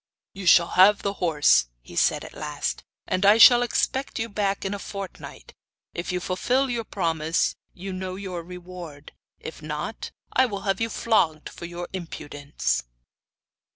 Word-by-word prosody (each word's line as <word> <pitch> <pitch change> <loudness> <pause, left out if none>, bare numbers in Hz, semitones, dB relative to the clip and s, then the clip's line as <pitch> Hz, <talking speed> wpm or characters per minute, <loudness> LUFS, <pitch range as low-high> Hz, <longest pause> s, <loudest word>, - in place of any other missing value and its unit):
'You 195 -2 -6
shall 170 0 +6
have 195 +3 +5
the 200 - -1
horse,' 150 - +4
he - - -14
said - - +2
at - - -11
last, - - -4 0.2
'and 185 - -1
I 205 +2 +7
shall 240 +1 +9
expect 260 +2 -1
you 225 +1 -2
back 200 -1 -1
in 195 - -1
a 200 - -4
fortnight. 195 -2 -8 0.4
If 170 - -4
you 180 - -1
fulfil 250 +9 0
your 235 -2 -2
promise 165 -4 0 0.2
you 190 +1 -6
know 185 0 -4
your 185 -3 -5
reward; 175 -4 -10 0.3
if - - -9
not, - - -5 0.2
I 260 0 +4
will 200 -4 -5
have 195 +2 -1
you 225 - 0
flogged 165 -11 +1
for 170 - -9
your 175 +1 -6
impudence. 145 - -3
185 Hz, 160 wpm, -25 LUFS, 170-205 Hz, 0.4 s, shall